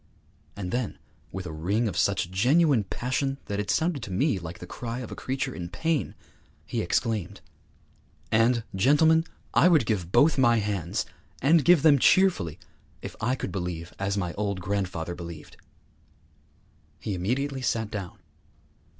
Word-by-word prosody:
And 90 Hz, -3 st, -5 dB
then, 120 Hz, -3 st, -2 dB, 0.3 s
with 95 Hz, -1 st, -6 dB
a 80 Hz, -, -5 dB
ring 95 Hz, +9 st, 0 dB
of 100 Hz, -, -3 dB
such 95 Hz, -2 st, +1 dB
genuine 130 Hz, -, +3 dB
passion 130 Hz, +6 st, -2 dB
that 100 Hz, 0 st, -3 dB
it 105 Hz, -1 st, -3 dB
sounded 160 Hz, -4 st, +1 dB
to 105 Hz, -, -7 dB
me 110 Hz, +2 st, +1 dB
like 85 Hz, 0 st, -8 dB
the -, -, -9 dB
cry 115 Hz, +5 st, -5 dB
of 120 Hz, -, -8 dB
a -, -, -5 dB
creature 130 Hz, 0 st, -3 dB
in 85 Hz, -1 st, -6 dB
pain, 160 Hz, -, -1 dB, 0.5 s
he -, -, -2 dB
exclaimed, 110 Hz, -6 st, -1 dB, 0.9 s
'And, 115 Hz, +1 st, +3 dB
gentlemen, 160 Hz, +10 st, +4 dB, 0.3 s
I -, -, +5 dB
would 160 Hz, -9 st, +4 dB
give 95 Hz, -6 st, -2 dB
both 145 Hz, +6 st, +4 dB
my 120 Hz, -3 st, +5 dB
hands, 100 Hz, -6 st, -2 dB, 0.3 s
and 150 Hz, +3 st, +4 dB
give 170 Hz, -1 st, +5 dB
them 145 Hz, -3 st, +6 dB
cheerfully, 175 Hz, -, +3 dB, 0.5 s
if -, -, -7 dB
I 125 Hz, +4 st, +1 dB
could -, -, -5 dB
believe 90 Hz, -3 st, -4 dB
as 100 Hz, +1 st, -1 dB
my 90 Hz, -3 st, -2 dB
old 100 Hz, -2 st, -2 dB
grandfather 90 Hz, -3 st, -2 dB
believed!' 85 Hz, -2 st, -9 dB, 1.4 s
He 105 Hz, -, -3 dB
immediately 130 Hz, +9 st, -2 dB
sat 110 Hz, -3 st, -1 dB
down. 100 Hz, -4 st, -6 dB
110 Hz, 155 wpm, -27 LUFS, 95-135 Hz, 1.4 s, them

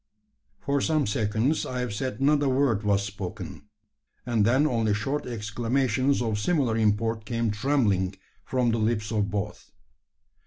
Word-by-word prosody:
For 140 Hz, 0 st, 0 dB
some 155 Hz, -3 st, +1 dB
seconds 110 Hz, +7 st, 0 dB
I 125 Hz, -, -4 dB
have 125 Hz, -4 st, -3 dB
said 130 Hz, +6 st, -3 dB
not 145 Hz, +2 st, +3 dB
a 140 Hz, -, +2 dB
word 130 Hz, -5 st, +2 dB
was 100 Hz, -2 st, +1 dB
spoken; 100 Hz, -2 st, -7 dB, 0.6 s
and 115 Hz, -3 st, +2 dB
then 130 Hz, +6 st, +4 dB
only 115 Hz, -7 st, +1 dB
short 135 Hz, +7 st, -2 dB
exclamations 120 Hz, +3 st, 0 dB
of 110 Hz, -3 st, -1 dB
similar 130 Hz, -2 st, +1 dB
import 110 Hz, +1 st, +1 dB
came 115 Hz, 0 st, -1 dB
trembling 105 Hz, -6 st, +1 dB, 0.3 s
from 125 Hz, -2 st, +1 dB
the 115 Hz, -, 0 dB
lips 110 Hz, -1 st, 0 dB
of 105 Hz, -2 st, 0 dB
both. 105 Hz, +1 st, -4 dB
115 Hz, 150 wpm, -26 LUFS, 105-130 Hz, 0.6 s, then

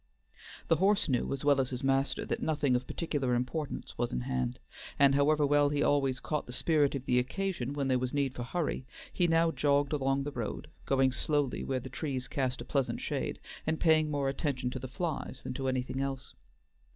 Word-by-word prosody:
The 165 Hz, -, +4 dB
horse 195 Hz, +2 st, +3 dB
knew 130 Hz, -4 st, 0 dB
as 140 Hz, +1 st, -3 dB
well 140 Hz, -2 st, +5 dB
as 130 Hz, -, -2 dB
his 125 Hz, +1 st, -4 dB
master 135 Hz, +1 st, +1 dB
that -, -, -2 dB
nothing 145 Hz, -5 st, +1 dB
of 125 Hz, +1 st, -1 dB
particular 140 Hz, -7 st, -1 dB
importance 135 Hz, +5 st, -3 dB
was -, -, 0 dB
in 60 Hz, -, -2 dB
hand, 60 Hz, 0 st, -2 dB, 0.4 s
and 140 Hz, -1 st, +6 dB
however 145 Hz, +2 st, +4 dB
well 145 Hz, 0 st, +4 dB
he 145 Hz, 0 st, +1 dB
always 135 Hz, -3 st, +2 dB
caught 150 Hz, +3 st, -3 dB
the -, -, -7 dB
spirit 145 Hz, +2 st, +2 dB
of 135 Hz, -1 st, -4 dB
the 125 Hz, -1 st, +3 dB
occasion 140 Hz, 0 st, -2 dB
when 140 Hz, -2 st, -1 dB
there 130 Hz, -1 st, +2 dB
was 125 Hz, 0 st, -2 dB
need 140 Hz, -2 st, 0 dB
for 125 Hz, -, -6 dB
hurry, 135 Hz, 0 st, -2 dB, 0.3 s
he 175 Hz, -, +3 dB
now 165 Hz, 0 st, +3 dB
jogged 145 Hz, -1 st, +2 dB
along 135 Hz, -1 st, +1 dB
the 145 Hz, -, -4 dB
road, 120 Hz, -5 st, -4 dB, 0.2 s
going 135 Hz, -1 st, +3 dB
slowly 145 Hz, 0 st, 0 dB
where 130 Hz, -1 st, -1 dB
the 125 Hz, -, -8 dB
trees 130 Hz, -1 st, -3 dB
cast 130 Hz, -2 st, -1 dB
a -, -, -7 dB
pleasant 135 Hz, -3 st, 0 dB
shade, -, -, -3 dB, 0.3 s
and 160 Hz, 0 st, 0 dB
paying 155 Hz, -2 st, +4 dB
more 145 Hz, -2 st, 0 dB
attention 135 Hz, -3 st, -1 dB
to 130 Hz, -, -4 dB
the 130 Hz, -, -6 dB
flies 145 Hz, -2 st, -4 dB
than -, -, -4 dB
to 135 Hz, 0 st, -3 dB
anything 130 Hz, +1 st, -1 dB
else. 135 Hz, -1 st, -4 dB
135 Hz, 210 wpm, -31 LUFS, 130-150 Hz, 0.4 s, and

